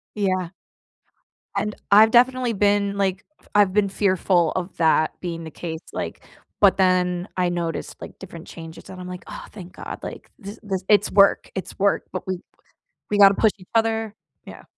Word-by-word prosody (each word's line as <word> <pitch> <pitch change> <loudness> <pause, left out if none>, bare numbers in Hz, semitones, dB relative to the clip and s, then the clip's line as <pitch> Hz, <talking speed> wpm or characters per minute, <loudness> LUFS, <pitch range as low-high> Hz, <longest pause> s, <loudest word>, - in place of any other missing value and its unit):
Yeah. 185 -4 -1 1.1
And, 210 0 -1 0.2
I've 215 +2 +7
definitely 250 0 +3
been 205 0 +2
f - - -8
like, 190 -1 -1 0.3
I've 205 -2 +4
been 205 0 +2
fearful 185 -4 +1
of 185 0 -4
that 160 -1 +3
being 165 -2 -5
the 160 - -8
case, 160 0 -6
like - - -5 0.4
but 195 -1 +5
then 180 0 +2
I 180 -1 +1
noticed, 170 -2 -4
like, - - -10
different 170 -3 -10
changes, 165 -1 -11
and 190 - -10
I'm 180 - -8
like, 180 0 -8
"Ah, - - -9
thank 180 -4 -10
God," - - -7
like, - - -8
this 205 0 -9
this 195 -3 -3
it's 210 -1 +4
work, 200 -1 +4
it's 190 - -6
work, 200 +1 +2
but 185 - -5
we 185 -1 -2 0.7
we 205 - 0
gotta 200 -1 +8
push 220 - +3
each 185 -2 -17
other, 225 -1 +1 0.3
yeah. - - -11
190 Hz, 180 wpm, -23 LUFS, 180-205 Hz, 1.1 s, gotta